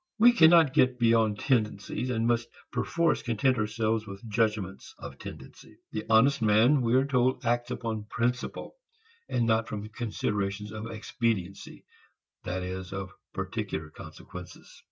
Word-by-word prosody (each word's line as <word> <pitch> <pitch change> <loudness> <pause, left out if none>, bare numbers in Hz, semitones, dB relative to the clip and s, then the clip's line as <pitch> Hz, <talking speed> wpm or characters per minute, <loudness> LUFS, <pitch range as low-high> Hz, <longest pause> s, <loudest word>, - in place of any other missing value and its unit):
We 235 +2 +7
cannot 165 - +6
get 130 -1 +3
beyond 115 -3 +3
tendencies, 110 -1 -1
and 115 -2 0
must 120 0 +1 0.2
perforce 165 +7 +1
content 120 +2 +1
ourselves 110 0 -1
with 100 +3 -9
judgments 105 -3 -1
of 70 -2 -10
tendency. - - -11
The 110 - -4
honest 125 +5 +4
man, 115 +6 +4
we 120 0 +2
are 130 +1 +4
told, 130 -2 +1
acts 120 +1 0
upon 115 -4 -4
"principle" 125 - -3 0.5
and 120 - +1
not 110 0 +2
from 105 0 -5
considerations 105 -2 -3
of 110 +1 -6
expediency, 110 -4 -3 0.6
that 90 +1 -3
is, 95 0 -5
of 95 -1 -5 0.2
particular 80 0 -4
consequences. - - -11
115 Hz, 135 wpm, -28 LUFS, 105-125 Hz, 0.6 s, We